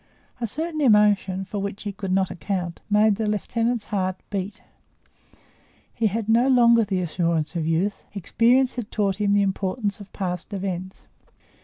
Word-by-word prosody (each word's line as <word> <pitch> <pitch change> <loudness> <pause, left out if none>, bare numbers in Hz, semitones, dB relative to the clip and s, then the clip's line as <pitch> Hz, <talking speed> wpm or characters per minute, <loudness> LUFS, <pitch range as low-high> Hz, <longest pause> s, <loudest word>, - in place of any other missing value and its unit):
A 235 - -2
certain 310 +6 -3
emotion, 205 -5 +3
for 205 +2 -5
which 200 0 -5
he 205 - -3
could 195 -1 -5
not 190 0 +1
account, 175 0 -3
made 210 0 +4
the 220 -1 -1
lieutenant's 230 +2 -1
heart 185 -2 0 0.2
beat: 200 +1 -4 1.3
he 225 - +1
had 215 +1 -2
no 235 +3 +4
longer 235 -3 +5
the 190 -3 -1
assurance 165 -2 -1
of 160 -2 -1
youth; 185 +5 0
experience 245 +7 +2
had 230 -4 -4
taught 200 -3 0
him 205 -1 +1
the 200 0 +4
importance 200 +2 -2
of 200 -1 -12
past 180 +1 -4
events. 185 -1 -5
200 Hz, 160 wpm, -24 LUFS, 185-225 Hz, 1.3 s, longer